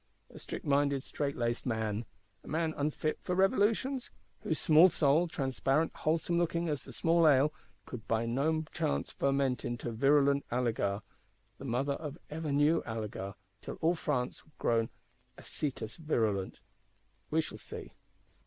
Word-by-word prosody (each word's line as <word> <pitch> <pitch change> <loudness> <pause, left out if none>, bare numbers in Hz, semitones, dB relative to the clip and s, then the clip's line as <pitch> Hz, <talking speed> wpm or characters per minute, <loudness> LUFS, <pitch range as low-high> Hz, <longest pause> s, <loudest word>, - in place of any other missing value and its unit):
A - - -11
strict - - -7
minded, 140 -1 +2
strait 140 -1 -3
laced 120 0 -1
man! 110 -2 -1 0.4
A - - -15
man 160 0 0
unfit 155 +1 -1
for 180 - -2
Revolutions? 215 +7 +2 0.3
Whose 160 - -1
small 160 +4 +7
soul, 155 +1 +3
transparent 135 0 0
wholesome 165 +2 0
looking 170 0 0
as 145 -2 -1
small 165 +4 +4
ale, 145 +1 +5 0.3
could 120 -2 -8
by 115 0 +1
no 150 +7 +1
chance 160 -3 -1
ferment 135 -3 +1
into 120 0 -3
virulent 140 +3 +3
alegar,—the 115 -1 -4
mother 135 +3 0
of 150 +1 -6
ever 155 -1 -3
new 145 +3 +4
alegar; 105 -3 -5 0.3
till - - -6
all 165 +2 +2
France 135 -7 -2
were 155 - -25
grown 115 -1 +1 0.5
acetous 125 -6 -4
virulent? 110 - -1 0.7
We - - +2
shall - - -3
see. - - -8
140 Hz, 140 wpm, -32 LUFS, 120-160 Hz, 0.7 s, small